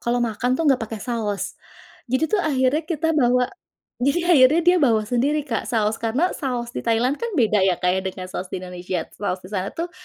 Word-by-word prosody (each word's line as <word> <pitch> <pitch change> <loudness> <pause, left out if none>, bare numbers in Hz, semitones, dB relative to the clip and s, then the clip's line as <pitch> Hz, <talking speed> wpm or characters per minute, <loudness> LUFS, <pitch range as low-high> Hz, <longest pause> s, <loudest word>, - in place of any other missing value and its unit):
kalau 240 0 0
makan 245 +3 -1
tuh 330 - -1
enggak 270 -5 +3
pakai 225 -1 -5
saus. 220 -5 -2 0.6
Jadi 260 +6 +1
tuh 410 - +3
akhirnya 275 -2 +1
kita 325 -1 -1
bawa, 250 -4 +3 0.5
jadi 315 +8 +1
akhirnya 295 0 +6
dia 355 +2 +5
bawa 225 -7 +3
sendiri 270 +7 0
Kak 230 -7 -3
saus, 220 -1 0
karena 255 +11 +1
saus 245 -4 -3
di - - -5
Thailand 240 +5 +1
kan 470 -4 -4
beda 220 -6 +3
ya 185 - +3
Kak 180 - +3
ya - - 0
dengan 185 0 -5
saus 185 - -4
di 185 - -5
Indonesia. 180 -1 -4 0.2
Saus 190 -2 -2
di 185 - -12
sana 195 -1 -3
tuh, 340 +1 -4
245 Hz, 210 wpm, -22 LUFS, 215-295 Hz, 0.6 s, akhirnya